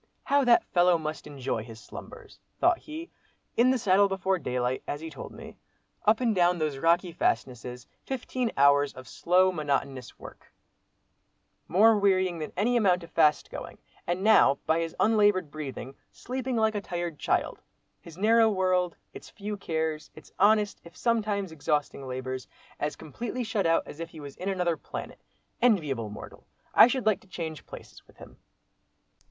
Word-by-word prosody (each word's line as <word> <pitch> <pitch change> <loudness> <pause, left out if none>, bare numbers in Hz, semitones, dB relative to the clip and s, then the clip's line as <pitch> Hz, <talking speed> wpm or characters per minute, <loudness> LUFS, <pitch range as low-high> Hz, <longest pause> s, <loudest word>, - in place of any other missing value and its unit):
"How 280 0 +3
that 240 -1 +5
fellow 175 -1 +3
must 155 -1 -5
enjoy 135 -6 -3
his 110 -1 -11
slumbers!" - - -12 0.2
thought 350 0 +3
he. 320 +3 -8 0.4
"In 245 +2 +4
the 260 - +3
saddle 200 -3 +4
before 190 -1 -1
daylight, 125 -2 -2
as 145 - -3
he 160 +1 -7
told 145 - -9
me; - - -11 0.5
up 215 +1 +4
and 240 -3 +1
down 175 -2 +3
these 155 -4 -2
rocky 170 +3 +2
fastnesses—fifteen 165 - -3
hours 140 0 +4
of 130 -1 -11
slow, 185 +9 +3
monotonous 140 -5 -3
work, - - -13 1.2
more 215 +4 +5
wearying 185 -3 +2
than 155 - -5
any 235 +6 +2
amount 185 -6 +3
of 170 - -12
fast 155 -2 +2
going—and 175 +2 -6
now, 210 -10 +5
by 160 +1 +2
his 165 -1 -3
unlaboured 205 -7 +3
breathing, 135 -3 -7 0.2
sleeping 255 0 -4
like 220 -1 +2
a 205 - -2
tired 175 -5 -4
child; - - -1 0.4
his 165 -1 -13
narrow 225 +3 +4
world—its 185 -3 -2
few 210 0 -6
cares—its 160 -4 -4
honest, 210 0 +3
if 170 +1 -15
sometimes 210 -5 0
exhausting 145 -3 -2
labours, 130 0 -5 0.3
as 150 0 -2
completely 235 - -5
shut 215 -5 0
out 165 0 +3
as 145 - -11
if 165 0 -5
he 160 - -12
was 140 -2 -9
in 190 - -3
another 180 -4 0
planet. - - -8 0.4
Enviable 150 - +2
mortal! 105 - -11 0.3
I - - +9
should 250 -1 -2
like 215 -2 +3
to - - -23
change 160 -4 -6
places - - -11
with - - -22
him." - - -14
175 Hz, 160 wpm, -28 LUFS, 150-210 Hz, 1.2 s, I